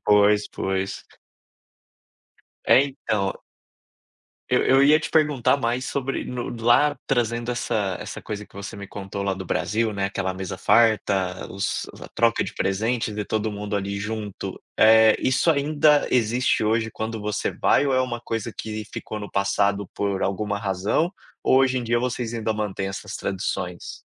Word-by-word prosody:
pois, 105 0 +4
pois. 95 0 -3 1.6
É, 135 - +6
então 110 -8 -2 1.2
eu - - +3
eu 135 +1 +5
ia 150 +2 +6
te - - -5
perguntar 145 -4 +3
mais 125 0 -1
sobre 135 -1 -2
no 125 -1 -4
d 115 -2 -8
lá 145 +5 +4
trazendo 120 -1 0
essa 105 -6 -1
essa - - -7
coisa 105 -1 -6
que - - -29
você 100 0 -7
me 100 -1 -8
contou 100 0 -6
lá 100 -1 0
do 95 0 -6
Brasil, 110 +5 0
né, 100 -1 -1
aquela 95 -1 -2
mesa 95 0 -5
farta, 100 -6 +2
os 100 +1 -2
a - - -9
troca - - +2
de - - -6
presentes 110 +2 -1
e 105 - -2
todo 110 0 -1
mundo 105 0 -4
ali 100 0 -2
junto, 105 -1 -5 0.2
eh, 110 0 +7
isso 130 +6 +2
ainda 150 0 +3
existe 120 0 +2
hoje 110 +1 +1
quando 110 +1 -4
você 105 0 -2
vai 145 - +2
ou 135 - +1
é 130 - +3
uma 120 -2 -3
coisa 115 -1 -4
que 110 -1 -5
ficou 110 - -5
no 105 - -8
passado 100 0 +1
por 100 -1 -1
alguma 100 +1 -1
razão, 100 - 0 0.3
ou 130 - +4
hoje 130 -1 +3
em 120 - -5
dia 120 +1 +1
vocês 125 -2 -2
ainda 110 -1 -1
mantém 100 -2 -3
essas 95 - -6
tradições? 90 -2 -4
110 Hz, 165 wpm, -24 LUFS, 100-120 Hz, 1.6 s, eh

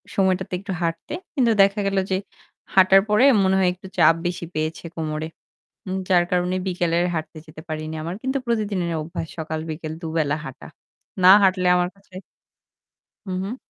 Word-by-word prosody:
সময়টাতে 190 -1 +1
একটু 195 - -7
হাঁটতে। 165 - -3 0.2
কিন্তু 245 -4 +3
দেখা 200 +1 +3
গেল 195 0 -1
যে, 185 - +2 0.6
হাঁটার 190 0 +7
পরে 210 +4 +4 0.2
মনে 190 0 +3
হয় 185 -1 +3
একটু 185 +1 -13
চাপ 165 - +6
বেশি 175 0 -3
পেয়েছে 155 +2 -3
কোমরে। 155 -1 -3 0.8
যার 175 -2 +5
কারণে 180 0 +1
বিকেলে 175 -2 0 0.2
হাঁটতে 160 0 -5
যেতে 155 0 -12
পারিনি। 155 0 -4
আমার 170 +3 -4
কিন্তু 265 +1 -1
প্রতিদিনের 205 -7 -1
অভ্যাস 165 +1 -5
সকাল 160 0 -4
বিকাল 155 0 -5
২ 165 -2 -5
বেলা 150 -2 +1
হাঁটা। - - -9 0.6
না 185 - +9
হাঁটলে 185 -1 +3
আমার 180 0 +1
কাছে 195 -1 -21 1.1
হুম, 185 - -3
হুম। 205 +5 -4
180 Hz, 160 wpm, -22 LUFS, 160-195 Hz, 1.1 s, না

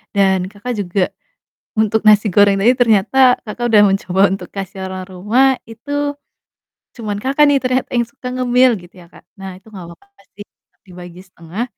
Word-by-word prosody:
dan, 190 -2 +1
Kakak, 240 +4 -6
juga 180 0 -2 0.6
untuk 220 0 +1
nasi 210 0 +5
goreng 200 -1 +4
tadi 240 +5 +4
ternyata, 225 +2 +2 0.3
Kakak, 230 +3 -6
udah 210 -2 +5
mencoba 190 -1 -1
untuk 195 - -7
kasih 195 0 -7
orang 185 0 -7
rumah 210 +8 +1 0.2
itu 285 +5 -4 0.8
cuman, 210 -4 -5
Kakak, 275 +3 +2
nih 275 - +3
ternyata 255 0 -1
yang 240 -1 +1
suka 255 -1 -11
ngemil 255 0 +3
gitu 175 +2 -18
ya, 175 -2 -15
Kak. - - -18 0.2
Nah 195 0 -7
itu 215 - -26
gak 180 -3 -9
apa-apa 400 - -21
sih, 205 +1 -11 0.4
dibagi 180 0 -12
setengah, 175 +6 -7
210 Hz, 170 wpm, -17 LUFS, 190-250 Hz, 0.8 s, nasi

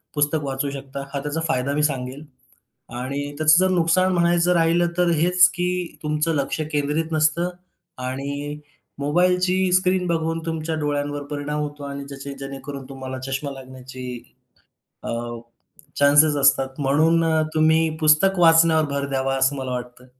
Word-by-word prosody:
पुस्तक 145 +1 +1
वाचू 135 +1 -2
शकता. 140 0 -7
हा 140 - -1
त्याचा 150 +2 -3
फायदा 140 -2 0
मी 150 +1 0
सांगेन 135 0 -2 0.8
आणि 140 +3 -3 0.2
त्याचं 155 +2 +5
जर 185 - +2
नुकसान 180 +2 +2
म्हणायचं 175 0 +2
राहिलं, 170 +1 +3
तर 175 -1 +3
हेच 180 +1 +5
की 180 0 -2
तुमचं 150 +1 0
लक्ष 145 +2 -2
केंद्रित 150 +3 -1
नसतं 155 +3 +2 0.6
आणि 140 +3 -4 0.4
मोबाईलची 180 +5 +2
स्क्रीन 185 0 +2
बघून 165 -1 -1
तुमच्या 160 0 -3
डोळ्यांवर 145 -1 -2
परिणाम 150 +1 -3
होतो 145 -1 -5
आणि 140 0 -6
त्याचे 140 0 -8
जेणेकरून 135 0 -7
तुम्हाला 130 -1 -7
चष्मा 135 +2 -3
लागण्याची 130 -1 -10 1.0
अ, - - -5 0.9
चान्सेस 145 +2 +5
असतात. 135 -1 +3
म्हणून 155 +5 +3 0.3
तुम्ही 160 +1 +3
पुस्तक 155 +5 +4
वाचण्यावर 165 -2 +5
भर 140 0 -2
द्यावा, 135 0 0
असं 135 +1 +1
मला 130 -1 -4
वाटतं. 125 0 -7
150 Hz, 140 wpm, -22 LUFS, 140-165 Hz, 1.0 s, त्याचं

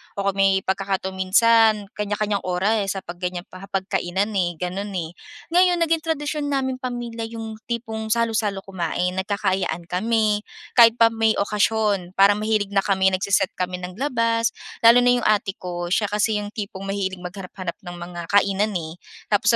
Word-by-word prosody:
o 200 - -2
kung 195 - -14
may 195 -1 +3
pagkakataon 190 0 -2
minsan 225 +4 +5 0.3
kanya-kanyang 210 -1 -1
oras 195 +3 +1
sa 195 - -4
'pag 175 -1 -9
ganyang 180 0 -4
hapagkainan, 190 0 -2
eh, 175 -2 +1
ganun, 195 +3 -3
eh. 170 -2 -4 0.3
Ngayon 355 +1 +4
naging 330 -1 +1
tradisyon 300 -2 -2
naming 260 -1 -1
pamilya 240 -3 -5
yung 225 -1 -7
tipong 220 -2 -4
salo-salo 225 -4 0
kumain 180 -1 -2
nagkakaayaan 190 -3 -1
kami 210 +2 +1 0.3
kahit 230 -1 +8
pa 230 - +7
may 225 -1 +2
okasyon 205 -2 +1
para 200 +1 +5
mahilig 215 -1 0
na 200 -1 +1
kami 190 -1 +3
nagse-set 190 0 +1
kami 180 0 -2
ng 180 0 -7
labas, 230 -3 +1 0.3
lalo 235 +2 +9
na 245 - +4
yung 245 - -3
ate 205 -2 +2
ko 175 -1 -5
siya 205 +4 +2
kasi 210 +1 +1
yung 205 0 -5
tipong 200 -3 -6
mahilig 195 -1 -2
maghanap-hanap 185 0 -6
ng 175 -3 -8
mga 175 0 -7
kainan 200 +1 +2
eh. 160 -2 -6 0.4
Tapos 210 +1 +3
200 Hz, 165 wpm, -23 LUFS, 190-225 Hz, 0.4 s, lalo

